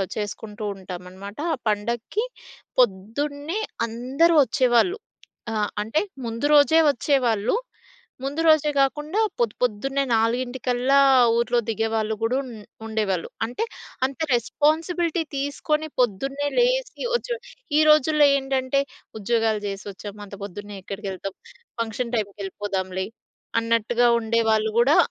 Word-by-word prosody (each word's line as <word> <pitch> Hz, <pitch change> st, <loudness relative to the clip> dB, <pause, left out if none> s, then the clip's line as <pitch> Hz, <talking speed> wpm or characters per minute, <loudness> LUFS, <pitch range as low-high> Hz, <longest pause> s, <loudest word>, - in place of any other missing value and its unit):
చేసుకుంటూ 210 Hz, +1 st, -5 dB
ఉంటామన్నమాట. 185 Hz, +2 st, -9 dB, 0.2 s
ఆ -, -, -2 dB
పండక్కి 235 Hz, -, -1 dB, 0.5 s
పొద్దున్నే 285 Hz, -, 0 dB, 0.3 s
అందరూ 265 Hz, +9 st, +2 dB
వచ్చేవాళ్ళు. 255 Hz, -, +2 dB, 0.5 s
ఆహ్, 210 Hz, -1 st, 0 dB
అంటే 225 Hz, +9 st, 0 dB, 0.3 s
ముందు 230 Hz, +5 st, -3 dB
రోజే 315 Hz, +3 st, +6 dB
వచ్చేవాళ్ళు. 240 Hz, -, +1 dB, 0.7 s
ముందు 285 Hz, +4 st, -2 dB
రోజే 310 Hz, -1 st, +5 dB
గాకుండా 295 Hz, +8 st, +1 dB, 0.2 s
పొద్దు, 230 Hz, -3 st, +1 dB
పొద్దున్నే 270 Hz, +4 st, 0 dB
నాలుగింటికల్లా 245 Hz, +3 st, +1 dB, 0.4 s
ఊరిలో 240 Hz, +1 st, +2 dB
దిగేవాళ్ళు 220 Hz, 0 st, 0 dB
కూడా 250 Hz, +4 st, +1 dB
ఉ -, -, -9 dB, 0.4 s
ఉండేవాళ్ళు. 210 Hz, -5 st, -1 dB, 0.2 s
అంటే, 245 Hz, -, -3 dB, 0.4 s
అంత 265 Hz, -1 st, -5 dB
రెస్పాన్సిబిలిటీ 320 Hz, -, +1 dB
తీసుకొని 300 Hz, +2 st, -1 dB
పొద్దున్నే 270 Hz, +6 st, 0 dB
లేచి -, -, +1 dB
వచ్చి, 485 Hz, 0 st, -1 dB, 0.4 s
ఈ -, -, +6 dB
రోజుల్లో 305 Hz, 0 st, +5 dB
ఏంటంటే 270 Hz, 0 st, 0 dB, 0.4 s
ఉద్యోగాలు 220 Hz, 0 st, +1 dB
జేసి 195 Hz, +1 st, -5 dB
వచ్చాం, 205 Hz, +1 st, -9 dB
అంత 200 Hz, -, -10 dB
పొద్దున్నే 205 Hz, +1 st, -7 dB
ఎక్కడికెళ్తాం? 195 Hz, -1 st, -5 dB, 0.5 s
ఫంక్షన్ 230 Hz, +2 st, -3 dB
టైమ్‌కి 205 Hz, -2 st, -2 dB
వెళ్ళిపోదాంలే 190 Hz, -1 st, -3 dB, 0.6 s
అన్నట్టుగా 230 Hz, +1 st, +2 dB
ఉండేవాళ్ళు 220 Hz, -1 st, +1 dB
గూడా 275 Hz, +6 st, +5 dB
235 Hz, 110 wpm, -24 LUFS, 210-285 Hz, 0.7 s, రోజే